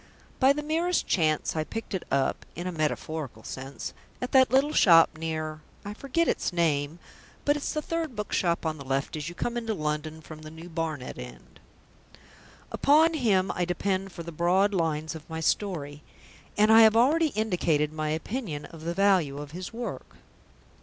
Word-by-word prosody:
By 265 0 +6
the 295 +1 -1
merest 330 +4 0
chance 155 -4 +1
I 155 - 0
picked 225 +6 -6
it 190 - -1
up 135 0 0
(in 175 - -5
a 185 - -2
metaphorical 155 -6 -3
sense) 135 +1 -7 0.3
at 250 - -4
that 260 -1 +6
little 275 +4 +3
shop 165 -3 +7
near 155 -1 -4 0.2
I 205 - -5
forget 275 +9 0
its - - 0
name, 160 -3 0 0.5
but 290 - +3
it's 295 - -3
the 305 - -2
third 330 -6 -3
bookshop 180 -5 -1
on 155 -1 -2
the - - -7
left 135 +2 -2
as 150 +1 -4
you 175 - -10
come 240 +5 -2
into 225 -2 -2
London 155 -1 -3
from 155 0 -11
the 155 - -9
New 160 +2 -11
Barnet 160 -5 -4
end. 60 0 -11 1.1
Upon 315 +3 +4
him 205 - +2
I 180 - -1
depend 190 +2 -1
for 170 - -8
the 170 - -7
broad 180 +5 +2
lines 160 -3 -1
of 160 0 -11
my 160 0 -4
story, 150 -4 -1 0.6
and 215 +1 +5
I 225 - +9
have 220 0 +6
already 310 +7 +4
indicated 170 -8 +1
my 155 -1 -2
opinion 160 - -3
of 160 -1 -11
the 170 +1 -2
value 185 -8 +3
of 145 0 -7
his 180 +3 -6
work. 235 +1 -6
170 Hz, 180 wpm, -27 LUFS, 155-225 Hz, 1.1 s, I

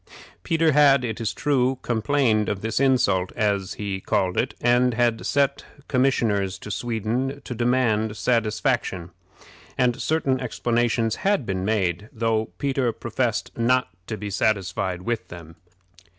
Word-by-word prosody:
Peter 165 - +2
had, 140 -3 +5
it 110 -1 -4
is 110 - -1
true, 135 -3 +1
complained 110 -2 +1
of 100 -2 -3
this 110 +1 -1
insult, 110 -9 +2
as 100 -3 0
he 100 -2 -4
called 90 -1 0
it, - - -1
and 120 0 +3
had 120 -1 +1
sent 140 0 +1 0.2
commissioners 115 -8 +1
to 105 - -8
Sweden 120 +6 -2
to - - -4
demand 115 -3 +1
satisfaction; 110 - 0 0.7
and 125 0 +1
certain 140 -5 +1
explanations 120 -2 0
had 195 - +1
been 95 -2 -2
made, 100 -1 -1
though 115 -3 0
Peter 135 -3 0
professed 115 0 -2
not 125 -1 +2 0.2
to 110 - -4
be 105 -1 -5
satisfied 95 -3 -1
with 110 -4 -2
them. 85 -2 -11
115 Hz, 135 wpm, -24 LUFS, 105-130 Hz, 0.7 s, had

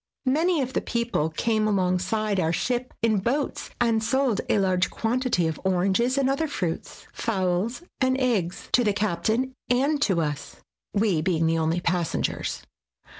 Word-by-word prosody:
Many 310 +3 +2
of 260 +1 -5
the - - 0
people 235 -10 -1
came 215 +5 0
alongside 195 +1 +1
our 165 -2 +1
ship 245 +8 -1
in 220 -3 +3
boats, 265 +8 -2
and 230 -2 +2
sold 260 -2 +1
a - - +3
large 185 -2 +2
quantity 235 -5 0
of 160 -1 -3
oranges 190 +7 +2
and 275 -1 +2
other 275 +4 +1
fruits, 175 - -4
fowls 195 - -1 0.2
and 260 0 +2
eggs, 210 -9 0
to 245 - +4
the 210 -3 +2
captain 220 +6 0 0.2
and 280 +4 +2
to 190 -10 +2
us, 150 -3 -3 0.4
we 200 -6 +1
being 165 -1 +1
the 165 0 +2
only 160 +2 0
passengers. 175 -1 -1
215 Hz, 155 wpm, -25 LUFS, 180-255 Hz, 0.4 s, to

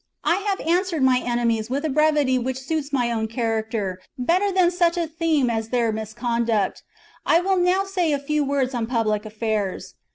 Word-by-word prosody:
" - - -53
I - - +1
have 395 -1 -2
answered 345 -2 0
my 255 -1 +4
enemies 235 -2 -1
with 280 +4 -2
a - - 0
brevity 295 -3 +2
which 260 +1 -3
suits 285 +2 -3
my 245 -4 +1
own 220 -1 -1
character 220 -4 -2 0.2
better 360 +10 +1
than 365 -2 +3
such 350 -1 +1
a 340 - +1
theme 320 -4 0
as 225 -1 -2
their 235 -2 +1
misconduct; 220 -1 -1 0.4
I 330 - +4
will 380 +1 +1
now 360 +2 +2
say 370 -5 0
a 290 - +2
few 295 +2 -1
words 275 -2 0
on 235 -2 -2
public 220 -3 0
affairs. 215 -3 -3
260 Hz, 190 wpm, -23 LUFS, 225-330 Hz, 0.4 s, my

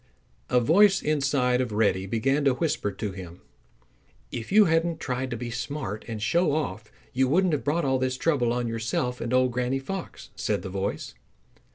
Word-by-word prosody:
A 125 - +4
voice 190 - +4
inside 140 -4 +1
of 125 -3 -2
Reddy 100 -3 +1
began 135 +7 +1
to 135 -2 +4
whisper 145 -9 -1
to 100 +1 -4
him. 90 -2 -10 0.9
"If 115 -2 -6
you 210 +1 +7
hadn't 165 0 +1
tried 130 0 -3
to 120 - -4
be 120 +1 -5
smart 120 -3 -4
and 115 -2 -5
show 165 +8 +2
off 110 -8 -3 0.2
you 130 +1 +2
wouldn't 175 +5 +2
have 150 - -1
brought 150 +2 0
all 130 -1 +1
this 130 0 -1
trouble 130 -6 +1
on 120 0 -1
yourself 115 +2 -2
and 120 - -3
Old 130 0 +3
Granny 125 +2 -1
Fox," 180 +7 -7
said - - -1
the 95 - -5
voice. 95 +1 -3
125 Hz, 185 wpm, -26 LUFS, 115-150 Hz, 0.9 s, you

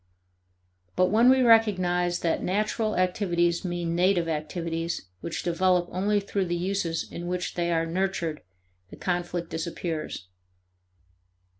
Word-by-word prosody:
But 185 0 +3
when 230 +4 +6
we 260 0 +5
recognize 185 -7 +3
that 165 - 0
natural 215 +3 0
activities 175 -2 +1
mean 175 -2 -2
native 175 0 +2
activities 165 - -3
which 165 - -4
develop 180 0 +2
only 205 +3 +1
through 200 -1 -2
the 175 0 -1
uses 175 -2 -1
in 175 +1 -6
which 180 0 -2
they 175 -1 -1
are 165 -1 +1
nurtured, 170 -2 -2 0.5
the - - -10
conflict 175 -1 -2
disappears. 160 - -4
175 Hz, 125 wpm, -27 LUFS, 170-190 Hz, 0.5 s, when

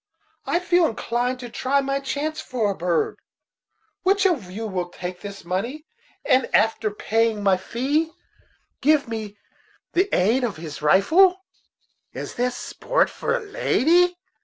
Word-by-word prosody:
I - - +2
feel 355 -1 +3
inclined 245 +2 -2
to 245 - -7
try 265 +4 0
my 275 0 -1
chance 290 +3 -3
for 225 -5 -1
a - - -4
bird. 170 -2 -1 0.8
Which 395 +1 +2
of 280 - +1
you 215 +5 -5
will 180 -4 -3
take 180 0 -7
this 200 -3 -8
money, 235 - -3 0.4
and, 255 0 +3
after 220 0 +2
paying 220 +1 0
my 195 -2 +4
fee, 270 - -1 0.7
give 300 -1 +3
me 215 -3 -5 0.6
the 375 +3 +2
aid 225 +8 +2
of 225 -8 -2
his 155 -2 -8
rifle?" 355 - +4 0.7
"Is - - -6
this 250 0 -1
a - - -7
sport - - +1
for 485 - -1
a - - -5
lady?" 355 - +2
245 Hz, 150 wpm, -23 LUFS, 200-310 Hz, 0.8 s, my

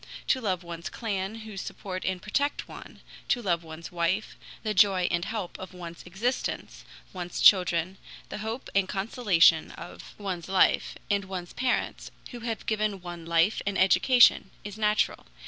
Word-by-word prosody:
To 260 - +3
love 185 -5 -1
one's 170 0 -6
clan 200 -2 -3
who 215 -2 -9
support 185 0 -6
and 190 -1 -1
protect 280 +10 -1
one, - - -12 0.3
to 245 - +3
love 175 -7 0
one's 160 +1 -9
wife, 175 +4 -1 0.3
the 215 -1 -1
joy 190 -2 +4
and 170 -1 0
help 215 -6 -5
of 185 -1 -9
one's 170 -2 -8
existence, 225 +9 -3 0.3
one's 180 -1 -5
children, 180 -1 +4 0.3
the - - -5
hope 225 +4 -5
and 195 -1 +2
consolation 200 -3 +3
of - - -11
one's 190 -4 -5
life, 190 -1 +3 0.2
and 200 -1 +1
one's 185 -2 -6
parents, 255 0 -1 0.2
who 245 - -7
have 230 -1 -4
given 215 -2 0
one 175 -2 -8
life 170 +5 +3
and 200 -1 0
education, 245 +2 +5
is 205 -1 -7
natural. 210 - +1
190 Hz, 160 wpm, -28 LUFS, 175-215 Hz, 0.3 s, education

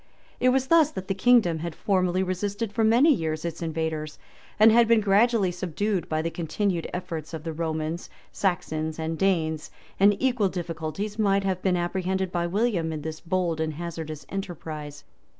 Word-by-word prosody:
It 255 - +4
was 260 0 +2
thus 320 +1 +5
that 190 0 -6
the 195 - 0
kingdom 190 -5 +4
had 170 0 -5
formerly 185 -2 +1
resisted 200 +4 -3
for 225 - +1
many 240 +8 +5
years 160 - -2
its 165 0 -4
invaders, 160 -2 -3 0.4
and 220 +1 +8
had 235 +1 +5
been 230 -1 +5
gradually 205 -1 +3
subdued 185 +2 -2
by 155 0 0
the 165 - -2
continued 170 +2 -2
efforts 165 -3 -5
of 155 - -7
the 165 -1 -4
Romans, 160 +1 -3 0.2
Saxons, 160 -4 -1
and 160 0 -2
Danes; 160 -4 0 0.3
and 200 +1 +5
equal 250 -7 +2
difficulties 175 +4 -4
might 200 -2 +3
have 190 -2 -1
been 185 -2 +2
apprehended 185 +1 -1
by 175 -1 -1
William 190 -4 0
in 155 -2 -5
this 160 0 -5
bold 175 -2 -1
and 155 -1 -2
hazardous 160 -2 -6
enterprise. 155 -6 -6
180 Hz, 170 wpm, -26 LUFS, 160-200 Hz, 0.4 s, and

